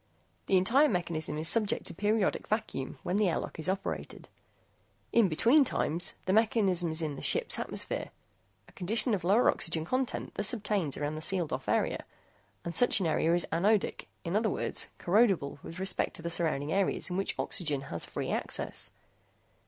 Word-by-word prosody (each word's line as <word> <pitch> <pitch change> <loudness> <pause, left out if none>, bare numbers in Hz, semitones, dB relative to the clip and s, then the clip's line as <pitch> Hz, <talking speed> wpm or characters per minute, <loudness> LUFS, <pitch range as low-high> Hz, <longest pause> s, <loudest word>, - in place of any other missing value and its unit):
The 190 - +4
entire 260 +11 +4
mechanism 170 -5 -2
is 155 +1 +1
subject 215 0 +3
to - - -4
periodic 210 -1 0
vacuum, 215 - -3
when 185 - -1
the 210 -3 +3
airlock - - -3
door - - -12
is 160 - 0
operated. 195 +1 -4 0.8
In 225 -5 +4
between 235 - +4
times, 175 - -1
the 185 - +1
mechanism 200 -6 +2
is 160 +1 0
in 150 -3 -3
the - - -7
ship's 470 0 +1
atmosphere. - - -3 0.6
A - - -18
condition 220 +6 +1
of 190 -4 -1
lower 205 +8 +4
oxygen 165 -1 0
content 255 +6 -2
thus 205 +2 +2
obtains 200 - -1
around 145 +1 -2
the 155 - -6
sealed 175 -1 0
off - - -4
area, - - 0 0.6
and 170 - -4
such 245 - +5
an 190 - -1
area 165 +1 +2
is 175 - 0
anodic 200 +5 +1 0.2
in 170 +2 -3
other 220 +1 +2
words, - - -1
corrodible 185 -8 +2
with 165 - -9
respect 190 +1 -1
to 165 - -6
the 170 - -2
surrounding 155 -3 0
areas 195 -1 0
in - - -2
which 195 +1 -1
oxygen 150 -6 0
has 85 -11 -5
free - - -4
access. - - 0
185 Hz, 180 wpm, -30 LUFS, 165-215 Hz, 0.8 s, such